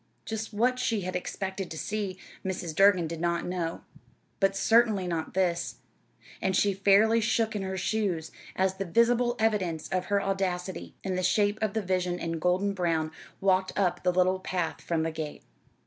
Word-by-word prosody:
Just 220 0 -4
what 245 +4 +1
she 225 -4 0
had 185 0 -4
expected 190 +1 -4
to 160 - -6
see, 200 0 -3 0.3
Mrs. 180 -3 -3
Durgin 195 -2 +5
did 165 0 -5
not 170 0 0
know 175 -2 -3 0.6
but 195 0 +2
certainly 220 -2 +3
not 165 -2 -3
this; 175 -2 0 0.7
and 190 - +1
she 200 +1 +3
fairly 205 +4 +4
shook 225 0 +1
in 205 - -1
her 190 0 -3
shoes 185 -5 -1 0.2
as 190 0 +1
the 195 - -2
visible 240 +5 +3
evidence 190 -8 0
of 185 -1 -1
her 200 +1 +2
audacity, 190 -2 -2
in 190 - -2
the 185 - 0
shape 205 +3 +2
of 215 -3 0
the 220 - 0
vision 180 -1 0
in 165 -1 -3
golden 185 +4 +1
brown, 165 -4 0 0.3
walked 190 -1 +1
up 180 -3 +1
the 180 - +2
little 185 +1 +2
path 165 -4 -2
from 165 -1 -1
the 165 - -1
gate. 155 -2 -6
190 Hz, 180 wpm, -28 LUFS, 175-205 Hz, 0.7 s, Durgin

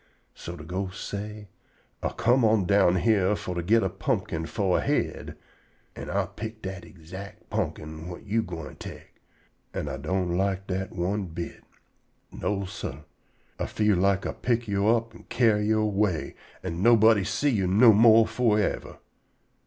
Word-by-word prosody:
So 85 - -8
de 75 - -10
ghost 95 +3 -4
say: 105 0 -6 0.5
"Ah - - 0
come 125 +2 +2
on 110 -3 +3
down 95 -2 +4
yere 105 -3 +3
fo' 90 - -5
to 85 - -2
git 110 +6 +3
a 95 - +1
pumpkin 95 -5 -2
fo' 95 -4 0
a - - +2
head, - - -2 0.6
an' - - -7
Ah 100 +1 0
pick 110 +4 -8
dat 95 -1 -5
ixact 95 +4 -11
pumpkin 80 +1 -3
whut 90 -1 -9
yo' 110 +3 +1
gwine 85 -7 -7
tek, - - -11 0.5
an' 75 - -3
Ah 70 -1 -4
don't 85 +4 -1
like 95 0 0
dat 95 0 -3
one 95 +3 -1
bit. 85 +1 -7 0.7
No, 100 -1 -2
sah. 75 -5 -7 0.6
Ah - - -1
feel 105 -3 +2
like 100 +1 +2
Ah - - -1
pick 120 -1 -1
yo' 100 0 +1
up 115 0 +2
an' - - -15
carry 110 -4 +2
yo' 110 0 +3
away, 100 -5 0 0.3
an' 85 -1 -4
nobody 110 -2 +6
see 140 +8 0
you 100 -6 +1
no 110 +5 +7
more 110 +1 +7
for 115 -2 +1
yever. 105 - -2
100 Hz, 170 wpm, -26 LUFS, 90-110 Hz, 0.7 s, no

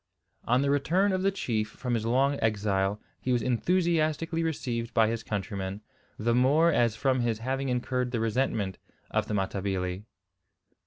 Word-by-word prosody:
On 125 +3 +3
the 140 - +2
return 175 +8 +2
of 185 -1 0
the 195 - +3
chief 110 - -2
from 125 +2 -4
his 115 -1 0
long 135 +4 +2
exile 100 -2 +1 0.2
he 130 - -2
was 120 -3 +2
enthusiastically 165 +4 +1
received 120 -7 -3
by 110 -2 +5
his 115 0 -2
countrymen, 100 -1 -4 0.4
the 115 +2 +1
more 145 +7 +4
as 120 -6 +2
from 130 +2 +1
his 120 -2 0
having 135 +4 -2
incurred 125 0 -1
the 120 -2 -2
resentment 110 -4 -1 0.3
of - - 0
the 105 - -2
Matabili. 95 -1 -2
120 Hz, 160 wpm, -28 LUFS, 105-140 Hz, 0.4 s, by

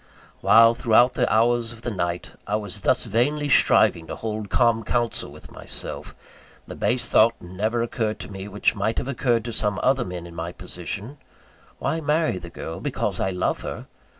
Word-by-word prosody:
While, 115 0 +6
throughout 120 +2 +4
the - - 0
hours 115 +1 +2
of 115 0 -12
the 120 - -2
night, 85 -3 -3
I 105 - 0
was 105 -4 -4
thus - - +1
vainly 145 +5 0
striving 85 -9 +4
to - - -5
hold 110 -2 -4
calm 115 -2 +2
counsel 120 +1 -1
with - - -14
myself; - - -7 0.5
the - - -8
base 120 0 0
thought 115 +1 +4
never 105 +7 -2
occurred 110 -2 -2
to - - -8
me, 95 0 -7
which 105 0 +1
might 105 +3 -1
have - - -2
occurred 120 -4 0
to 120 - -4
some 105 -1 0
other 130 -1 +3
men, 90 -4 -6
in 85 - -11
my 85 +1 -5
position: 100 - -7 0.6
Why 165 - -2
marry 150 - +1
the 85 -1 -9
girl, 80 0 -7
because - - -2
I 95 - 0
love 90 -1 -1
her? - - -6
110 Hz, 185 wpm, -24 LUFS, 95-120 Hz, 0.6 s, While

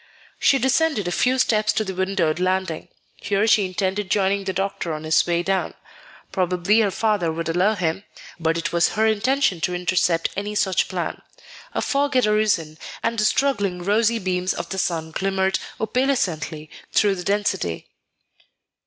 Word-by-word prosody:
She 275 - +4
descended 265 - +1
a - - -1
few 250 +8 +2
steps 215 -4 +2
to 220 - 0
the 190 -2 -5
windowed 185 -4 0
landing. 185 -3 -1 0.3
Here 200 +1 0
she 215 -2 +4
intended 190 +1 -2
joining 195 0 +1
the 190 - -1
doctor 195 -3 -2
on 155 0 -6
his 155 +1 +2
way 170 0 +1
down. 190 +1 -1 0.6
Probably 185 +3 +2
her 215 -3 +3
father 205 -5 0
would 165 +1 -4
follow 180 +6 +2
him; 175 0 -2 0.4
but 165 0 0
it 165 - -3
was 170 0 +2
her 220 +1 +2
intention 220 - +1
to 180 - 0
intercept 175 -1 +1
any 205 +2 -4
such 190 -3 +1
plan. - - -4 0.5
A - - 0
fog 285 0 0
had 255 - +4
arisen, 205 -8 +1 0.2
and 230 0 0
the 215 - +2
struggling 205 -9 +1
rosy 220 +4 +2
beams 185 -2 -1
of 170 0 -5
the 190 - -3
sun 160 -3 -2
glimmered 190 +2 0 0.2
opalescently 185 - -1 0.2
through 205 -2 +3
the 180 -2 -5
density. 195 - -1
190 Hz, 165 wpm, -22 LUFS, 175-215 Hz, 0.6 s, She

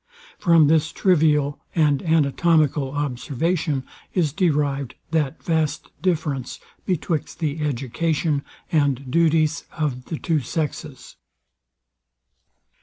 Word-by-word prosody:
From 170 -4 +5
this 155 +1 +3
trivial 150 -5 +2 0.2
and 150 -4 +3
anatomical 155 -2 +2
observation 145 +2 -1 0.3
is 160 -7 +1
derived 145 - 0 0.2
that 160 -2 -1
vast 160 -3 -1
difference 155 -8 -1 0.3
betwixt 170 -3 -2
the 155 -2 -2
education 145 +3 -1 0.3
and 140 -4 +1
duties 160 0 +2
of 135 -6 -3
the 160 - -4
two 160 0 0
sexes. 150 0 -5
150 Hz, 95 wpm, -23 LUFS, 140-165 Hz, 0.3 s, From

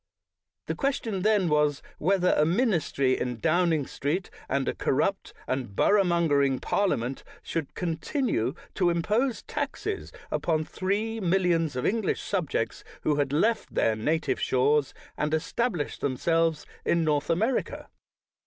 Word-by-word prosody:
The - - -2
question 240 -8 -1
then 210 -2 +3
was, 150 -2 +2 0.2
whether 180 +1 +3
a 150 - +4
ministry 165 - +1
in 125 -2 -3
Downing 165 -3 +2
Street, 155 +10 -3 0.2
and 135 0 0
a - - +1
corrupt 195 +8 0
and 130 -6 -3
borough 205 - +4
mongering 145 -7 +2
parliament, 130 - -1 0.2
should 160 -4 -4
continue 170 - -1 0.2
to 180 -3 +2
im 170 -1 0
pose 235 +5 0
taxes 415 -1 -4 0.2
upon 155 -2 0
three 210 +6 -2
millions 175 -5 +1
of 125 - -2
English 220 -1 0
sub 180 -7 -1
jects 115 - -2 0.2
who 150 -1 +1
had 140 -2 0
left 215 +10 +1
their 110 - +2
native 155 +9 0
shores 140 +2 +2 0.2
and 150 +1 -1
estab 200 +8 0
lished 145 -3 -4
themselves 165 +3 +1 0.2
in 170 -1 +2
North 150 -2 0
America. 220 +10 0
165 Hz, 140 wpm, -27 LUFS, 145-195 Hz, 0.2 s, a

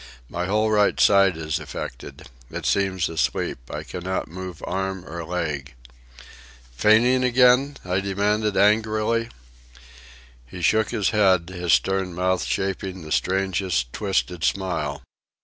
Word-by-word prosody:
My 90 +1 -3
whole 110 +2 +1
right 105 -1 +3
side 100 -4 +5
is 80 -2 -2
affected. - - -8 0.2
It - - -6
seems 95 -4 +1
asleep. 80 -6 -1
I - - -5
cannot 90 +1 -4
move 90 0 -8
arm 95 -1 -3
or 85 +2 -6
leg." 75 -5 -4 1.0
"Feigning 115 - +4
again?" 125 +3 +4
I 90 +1 0
demanded 100 +2 0
angrily. 110 +3 +2 1.2
He 90 +7 -8
shook 110 +4 +3
his 110 -5 0
head, 95 -5 +3
his 90 -2 0
stern 95 -2 +1
mouth 90 +1 0
shaping 95 -2 -3
the 75 - -10
strangest, 95 -10 0
twisted 95 -4 -1
smile. 80 -8 -1
95 Hz, 125 wpm, -23 LUFS, 90-105 Hz, 1.2 s, side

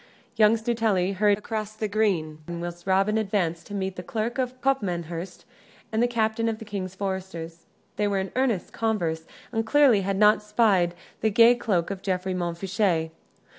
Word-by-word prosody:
Young 220 0 +5
Stuteley 220 -5 0
hurried 205 +1 +3
across 215 0 -4
the 215 0 -2
green, 190 -8 0
whilst 175 +1 -6
Robin 195 +3 +3
advanced 185 -6 -1
to 205 - -6
meet 190 -1 -3
the - - -4
Clerk 225 +7 -3
of 255 0 -2
Copmanhurst 180 -9 -2 0.5
and 220 +1 +1
the 240 - +4
captain 230 -1 0
of 220 - -3
the 220 - -10
King's 190 -3 -5
Foresters. 185 -4 -5 0.3
They 210 0 +1
were 200 -1 0
in 190 0 -2
earnest 250 -8 0
converse, 170 -8 -1 0.2
and 225 -2 0
clearly 245 -3 +4
had 195 0 -1
not 210 +1 +5
spied 210 -5 +2 0.2
the 220 - +2
gay 230 +3 +7
cloak 200 -7 -1
of 195 -1 -5
Geoffrey 185 -1 -1
Montfichet. 175 -1 -1
200 Hz, 170 wpm, -26 LUFS, 180-220 Hz, 0.5 s, gay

